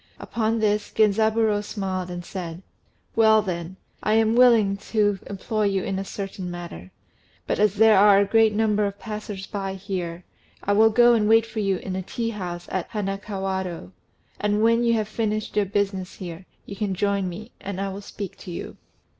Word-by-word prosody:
Upon 225 Hz, 0 st, -1 dB
this 210 Hz, -1 st, +1 dB
Genzaburô 220 Hz, 0 st, +2 dB
smiled 190 Hz, -3 st, -3 dB
and 175 Hz, -1 st, -6 dB
said, 175 Hz, -1 st, -6 dB, 0.5 s
"Well, 220 Hz, -1 st, +5 dB
then, 175 Hz, -1 st, -5 dB, 0.2 s
I 215 Hz, -, +1 dB
am 225 Hz, 0 st, +3 dB
willing 230 Hz, -5 st, +5 dB
to 205 Hz, -3 st, +2 dB
employ 210 Hz, +2 st, -2 dB
you 195 Hz, -2 st, +1 dB
in 190 Hz, 0 st, -2 dB
a -, -, -2 dB
certain 195 Hz, -2 st, -6 dB
matter; 170 Hz, -, -8 dB, 0.6 s
but -, -, -1 dB
as 210 Hz, -1 st, +3 dB
there 220 Hz, +1 st, +6 dB
are 200 Hz, 0 st, +7 dB
a 200 Hz, -, +4 dB
great 225 Hz, +1 st, +4 dB
number 210 Hz, -1 st, +1 dB
of 200 Hz, 0 st, -6 dB
passers 210 Hz, -3 st, -6 dB
by 195 Hz, -2 st, -4 dB
here, 180 Hz, -3 st, -5 dB, 0.4 s
I 205 Hz, -, +1 dB
will 220 Hz, +2 st, +6 dB
go 240 Hz, +2 st, +6 dB
and 215 Hz, -2 st, +2 dB
wait 225 Hz, 0 st, +5 dB
for 220 Hz, -1 st, -6 dB
you 195 Hz, -2 st, +1 dB
in 185 Hz, 0 st, -5 dB
a 190 Hz, -, -2 dB
tea 230 Hz, +5 st, -3 dB
house 175 Hz, -4 st, -6 dB
at 185 Hz, -2 st, -2 dB
Hanakawado; 195 Hz, -, -3 dB, 0.5 s
and 210 Hz, +1 st, +1 dB
when 230 Hz, +1 st, +4 dB
you 235 Hz, -1 st, +3 dB
have 215 Hz, -2 st, -1 dB
finished 215 Hz, -1 st, -2 dB
your 210 Hz, -1 st, +3 dB
business 195 Hz, -1 st, -2 dB
here, 180 Hz, 0 st, -8 dB, 0.2 s
you 200 Hz, -, -8 dB
can 200 Hz, -2 st, -2 dB
join 200 Hz, -1 st, 0 dB
me, 215 Hz, +7 st, -9 dB
and 195 Hz, -1 st, -5 dB
I 195 Hz, 0 st, -1 dB
will 195 Hz, +1 st, -6 dB
speak 200 Hz, -1 st, -7 dB
to -, -, -10 dB
you." 170 Hz, -, -7 dB
200 Hz, 190 wpm, -24 LUFS, 190-215 Hz, 0.6 s, are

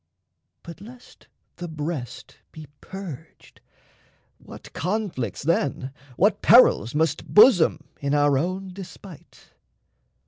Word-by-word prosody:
But 170 Hz, +1 st, -11 dB
lest 245 Hz, +4 st, -15 dB, 0.3 s
the 175 Hz, -, -6 dB
breast 150 Hz, -5 st, -7 dB
be 155 Hz, -1 st, -11 dB, 0.2 s
purged, 170 Hz, -6 st, -11 dB, 0.8 s
what -, -, -14 dB
conflicts 185 Hz, -, -3 dB
then, 140 Hz, -4 st, -1 dB, 0.3 s
What 205 Hz, +4 st, +2 dB
perils, 145 Hz, -, +5 dB
must 155 Hz, 0 st, -1 dB
bosom, 205 Hz, -, +5 dB, 0.2 s
in 140 Hz, +1 st, -1 dB
our 145 Hz, -1 st, +3 dB
own 185 Hz, +6 st, -2 dB
despite! 185 Hz, -3 st, -13 dB
165 Hz, 100 wpm, -23 LUFS, 145-195 Hz, 0.8 s, perils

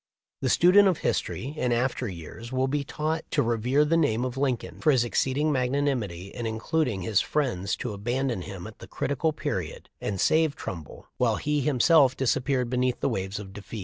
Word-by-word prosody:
The 130 Hz, -, 0 dB
student 185 Hz, +8 st, +6 dB
of 180 Hz, -5 st, +2 dB
history 135 Hz, +4 st, -1 dB
in 125 Hz, -5 st, 0 dB
after 125 Hz, +1 st, 0 dB
years 95 Hz, +6 st, -8 dB
will 130 Hz, 0 st, +1 dB
be 145 Hz, +1 st, -1 dB
taught 155 Hz, +3 st, -2 dB
to -, -, +2 dB
rever 120 Hz, +5 st, +2 dB
the 160 Hz, +2 st, +2 dB
name 125 Hz, -7 st, +2 dB
of 125 Hz, -1 st, -4 dB
Lincoln 135 Hz, -3 st, -2 dB
for 155 Hz, -, +3 dB
his 130 Hz, -5 st, +4 dB
exceeding 135 Hz, +5 st, +1 dB
magnanimity 125 Hz, -9 st, -1 dB
in 120 Hz, +1 st, -5 dB
inducting 110 Hz, -, -1 dB
his 105 Hz, +1 st, +2 dB
friends 120 Hz, -10 st, -1 dB
to 120 Hz, -, -4 dB
abandon 120 Hz, +2 st, -1 dB
him 90 Hz, 0 st, -7 dB
at 110 Hz, 0 st, -11 dB
the -, -, -10 dB
critical 140 Hz, +3 st, -1 dB
period 150 Hz, -, -4 dB
and 100 Hz, -2 st, -3 dB
save 155 Hz, -, +3 dB
Trumbull, 80 Hz, -5 st, -8 dB
while 115 Hz, -3 st, +2 dB
he 150 Hz, +5 st, 0 dB
himself 135 Hz, 0 st, +4 dB
disappeared 130 Hz, 0 st, +1 dB
beneath 125 Hz, 0 st, 0 dB
the -, -, 0 dB
waves 95 Hz, +1 st, -3 dB
of 100 Hz, -2 st, -8 dB
defeat. 105 Hz, +2 st, -8 dB
125 Hz, 185 wpm, -27 LUFS, 110-145 Hz, -, student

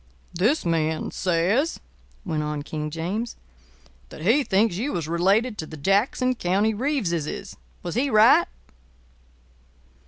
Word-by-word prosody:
"This 215 Hz, -, +1 dB
man 160 Hz, -2 st, 0 dB
says," 190 Hz, -, 0 dB, 0.5 s
went 160 Hz, -4 st, -1 dB
on 150 Hz, -1 st, -3 dB
King 150 Hz, 0 st, -4 dB
James, 185 Hz, +9 st, -3 dB, 0.7 s
"that -, -, -11 dB
he 240 Hz, -, +4 dB
thinks 200 Hz, -4 st, +1 dB
you 260 Hz, +8 st, -2 dB
was 165 Hz, -3 st, -3 dB
related 200 Hz, +8 st, +1 dB
to 160 Hz, -, -4 dB
the 160 Hz, -, -9 dB
Jackson 205 Hz, -, +1 dB
County 205 Hz, 0 st, +1 dB
Reeveses. 205 Hz, -, -2 dB, 0.3 s
Was 175 Hz, -, -4 dB
he 265 Hz, +5 st, +1 dB
right?" 215 Hz, 0 st, +6 dB
190 Hz, 125 wpm, -24 LUFS, 165-230 Hz, 0.7 s, right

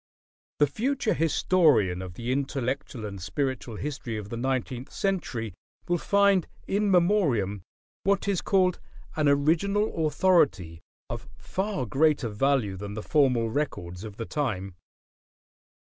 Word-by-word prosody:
The 145 Hz, -, +5 dB
future 230 Hz, -, 0 dB
historian 155 Hz, -, +3 dB
of 90 Hz, -2 st, -7 dB
the 120 Hz, +4 st, -3 dB
intellectual 135 Hz, -3 st, -2 dB
and 100 Hz, -2 st, -7 dB
spiritual 130 Hz, -, -3 dB
history 135 Hz, -3 st, -4 dB
of 105 Hz, -1 st, -7 dB
the 115 Hz, -, -4 dB
nineteenth 130 Hz, +1 st, -2 dB
century 130 Hz, -, -2 dB, 0.3 s
will 175 Hz, 0 st, +1 dB
find 200 Hz, -3 st, +3 dB, 0.2 s
"In 205 Hz, +1 st, +1 dB
Memoriam" 165 Hz, -, +2 dB, 0.4 s
what 200 Hz, +1 st, +1 dB
is 195 Hz, -3 st, +1 dB
called 185 Hz, -3 st, +2 dB, 0.4 s
"an 155 Hz, -2 st, +2 dB
original 165 Hz, +5 st, +2 dB
authority" 135 Hz, -, +2 dB, 0.3 s
of -, -, -6 dB
far 190 Hz, -5 st, -2 dB
greater 140 Hz, +1 st, +2 dB
value 110 Hz, -2 st, +1 dB
than 100 Hz, +1 st, -6 dB
the 110 Hz, -, -5 dB
formal 125 Hz, -7 st, +2 dB
records 90 Hz, -10 st, -3 dB
of 105 Hz, -2 st, -8 dB
the 115 Hz, -, -4 dB
time. 105 Hz, -, -2 dB
140 Hz, 130 wpm, -27 LUFS, 110-175 Hz, 0.4 s, The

